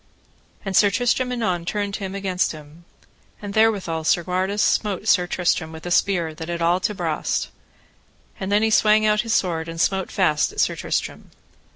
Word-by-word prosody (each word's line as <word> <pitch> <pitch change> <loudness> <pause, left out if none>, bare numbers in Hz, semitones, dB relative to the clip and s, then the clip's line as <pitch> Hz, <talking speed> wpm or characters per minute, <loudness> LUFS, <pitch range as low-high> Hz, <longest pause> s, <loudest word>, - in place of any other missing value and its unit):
And 195 -1 -3
Sir 205 - +6
Tristram 250 +3 0
anon 195 -8 -1
turned 200 +2 -3
him 195 -1 -6
against 190 -3 -1
him. 155 +2 -14 0.5
And 205 -1 -7
therewithal 200 -7 +1
Segwarides 185 +5 0
smote 210 0 0
Sir 180 -4 +3
Tristram 175 -2 -1
with 160 +1 -10
a 175 - -4
spear 175 -4 +1
that 160 +2 -8
it 170 0 -3
all 170 +2 +2
to 210 +3 -2
brast; 165 -5 -2 0.9
and 190 +1 -4
then 205 +1 +3
he 220 - +2
swang 215 0 +4
out 210 0 +3
his 230 -2 -1
sword 165 -3 -1
and 165 0 -7
smote 190 +1 0
fast 155 -6 +1
at - - -8
Sir - - +2
Tristram. - - -4
185 Hz, 180 wpm, -22 LUFS, 170-210 Hz, 0.9 s, Sir